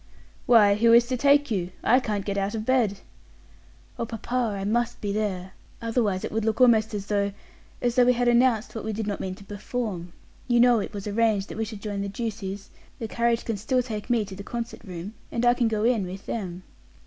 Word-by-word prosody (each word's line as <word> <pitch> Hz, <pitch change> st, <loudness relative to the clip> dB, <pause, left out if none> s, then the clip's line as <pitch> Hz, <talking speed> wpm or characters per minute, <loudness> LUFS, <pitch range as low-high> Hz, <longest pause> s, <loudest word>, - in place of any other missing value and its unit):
"Why, 210 Hz, -4 st, +7 dB
who 230 Hz, +3 st, +4 dB
is 235 Hz, 0 st, +7 dB
to 255 Hz, -, +1 dB
take 285 Hz, +1 st, +3 dB
you. 180 Hz, -4 st, -1 dB
I 250 Hz, +3 st, +5 dB
can't 210 Hz, -6 st, -3 dB
get 200 Hz, -, -2 dB
out 200 Hz, +2 st, -1 dB
of 215 Hz, -1 st, -4 dB
bed." 225 Hz, -6 st, +1 dB, 1.0 s
"Oh, 235 Hz, -, 0 dB
papa, 230 Hz, -1 st, -2 dB
I -, -, -4 dB
must 240 Hz, +3 st, 0 dB
be 205 Hz, -, -2 dB
there. 190 Hz, -3 st, -2 dB, 0.3 s
Otherwise 225 Hz, -5 st, 0 dB
it -, -, -5 dB
would 220 Hz, 0 st, -1 dB
like 220 Hz, +1 st, 0 dB
almost 225 Hz, -3 st, +4 dB
as 200 Hz, -1 st, -4 dB
though 200 Hz, -1 st, 0 dB, 0.5 s
as 240 Hz, -1 st, +2 dB
though 250 Hz, 0 st, +5 dB
we 250 Hz, -, +5 dB
had 245 Hz, 0 st, 0 dB
announced 240 Hz, -2 st, +3 dB
what 225 Hz, -, -5 dB
we 220 Hz, +1 st, -3 dB
did 220 Hz, +1 st, -3 dB
not 205 Hz, -1 st, -3 dB
mean 185 Hz, -1 st, -4 dB
to 200 Hz, -, -14 dB
perform. 200 Hz, -3 st, -5 dB, 0.3 s
You 240 Hz, -1 st, +3 dB
know 240 Hz, -1 st, +6 dB
it 200 Hz, -, -4 dB
was 200 Hz, -, -5 dB
arranged 210 Hz, -1 st, +1 dB
that -, -, -7 dB
we 225 Hz, -, 0 dB
should 215 Hz, -2 st, -9 dB
join 205 Hz, -2 st, -3 dB
the 200 Hz, -, -3 dB
Ducies; 200 Hz, -2 st, -5 dB, 0.3 s
the 225 Hz, -, -4 dB
carriage 235 Hz, +1 st, 0 dB
can 225 Hz, -3 st, -2 dB
still 250 Hz, +5 st, 0 dB
take 215 Hz, -2 st, -6 dB
me 235 Hz, -3 st, +2 dB
to 195 Hz, -1 st, -9 dB
the 195 Hz, -, -8 dB
concert 230 Hz, +3 st, -6 dB
room, 185 Hz, 0 st, -7 dB, 0.2 s
and 235 Hz, -, 0 dB
I 240 Hz, -, +6 dB
can 245 Hz, -1 st, +1 dB
go 215 Hz, -1 st, -1 dB
in 225 Hz, -5 st, +2 dB
with 190 Hz, +2 st, -8 dB
them." 185 Hz, -5 st, -4 dB
220 Hz, 230 wpm, -26 LUFS, 200-235 Hz, 1.0 s, Why